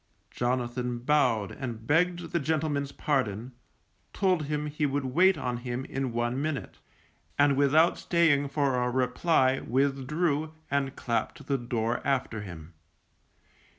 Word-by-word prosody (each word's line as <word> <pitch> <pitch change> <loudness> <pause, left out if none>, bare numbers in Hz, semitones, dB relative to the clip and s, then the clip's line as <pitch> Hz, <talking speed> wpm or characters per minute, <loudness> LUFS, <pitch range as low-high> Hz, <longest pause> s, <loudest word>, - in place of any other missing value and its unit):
Jonathan 125 0 -1
bowed 125 -5 +2
and 115 -4 -6
begged 170 +4 +1
the 170 - +1
gentleman's 145 -2 -1
pardon, 125 -5 -1 0.6
told 185 -6 +1
him 150 0 -2
he 150 +1 -4
would 140 0 -1
wait 180 +9 +4
on 125 -1 -2
him 120 +1 -4
in 135 -2 -3
one 120 +3 -1
minute, 155 -2 -4 0.6
and 145 -1 +4
without 145 +5 +4
staying 150 -5 +2
for 140 -3 +1
a 125 - +1
reply 130 +2 +2
withdrew, 140 +4 0 0.2
and 140 -2 0
clapped 120 +6 -2
the 140 -1 0
door 120 0 -1
after 130 -5 -1
him. 85 -4 -9
135 Hz, 130 wpm, -28 LUFS, 125-150 Hz, 0.6 s, wait